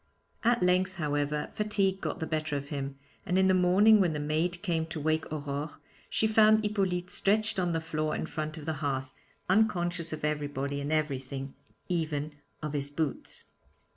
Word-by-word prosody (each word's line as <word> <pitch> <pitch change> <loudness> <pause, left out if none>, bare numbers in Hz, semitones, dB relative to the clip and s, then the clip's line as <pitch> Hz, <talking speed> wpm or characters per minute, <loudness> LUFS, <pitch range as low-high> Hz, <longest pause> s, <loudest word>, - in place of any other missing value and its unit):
At 240 -3 +3
length, 185 +1 +2
however, 150 -2 -1
fatigue 200 -2 0
got 155 - -3
the 160 - -2
better 155 -2 -1
of 140 0 -6
him, 140 -2 -4 0.3
and 180 - 0
in 190 0 +5
the 190 - +5
morning 190 +4 +6
when 175 -4 +2
the 150 - -2
maid 160 +4 -1
came 165 -3 0
to 160 -1 -5
wake 155 +1 0
Aurore, 145 0 -4 0.3
she - - +1
found 215 0 +5
Hippolyte 190 -4 0
stretched 215 0 +1
on 175 -2 +1
the 165 - 0
floor 155 -1 -2
in - - -2
front 155 -1 -4
of 150 - -8
the 160 - -1
hearth, 135 -2 -2 0.3
unconscious 175 -4 +2
of 155 -1 -3
everybody 145 -2 -2
and 145 +2 -3
everything 135 -3 -2 0.3
even 155 -4 -1 0.3
of 150 -1 -3
his 140 -1 -1
boots. 150 0 -3
160 Hz, 175 wpm, -30 LUFS, 145-185 Hz, 0.3 s, morning